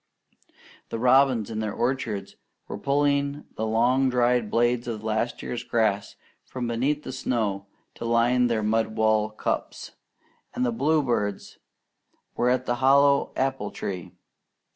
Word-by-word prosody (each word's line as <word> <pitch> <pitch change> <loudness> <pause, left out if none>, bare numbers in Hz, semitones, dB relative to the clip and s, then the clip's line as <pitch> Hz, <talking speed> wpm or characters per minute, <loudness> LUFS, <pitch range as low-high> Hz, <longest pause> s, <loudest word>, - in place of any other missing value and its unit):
The - - -3
robins 125 -2 +3
in 110 - -3
the 110 -1 -2
orchards 115 -3 -2 0.3
were 100 - -6
pulling 140 +2 0
the 110 - -2
long 125 +4 +2
dried 125 -2 +2
blades 120 +1 +1
of 110 -2 -4
last 110 +2 -2
year's 120 -1 -4
grass 110 -4 0 0.3
from 125 -2 -5
beneath 130 +6 -1
the - - -6
snow 110 -6 -2 0.3
to - - -7
line 120 +2 +3
their 115 -2 0
mud 110 +1 0
walled 110 -1 +1
cups; - - -3 0.6
and 125 - 0
the 120 - +1
bluebirds 120 -7 -1 0.8
were 120 - +1
at 125 0 +1
the 120 - -1
hollow 140 +2 +4
apple 135 -6 -1
tree. 90 -3 -6
120 Hz, 140 wpm, -25 LUFS, 110-130 Hz, 0.8 s, hollow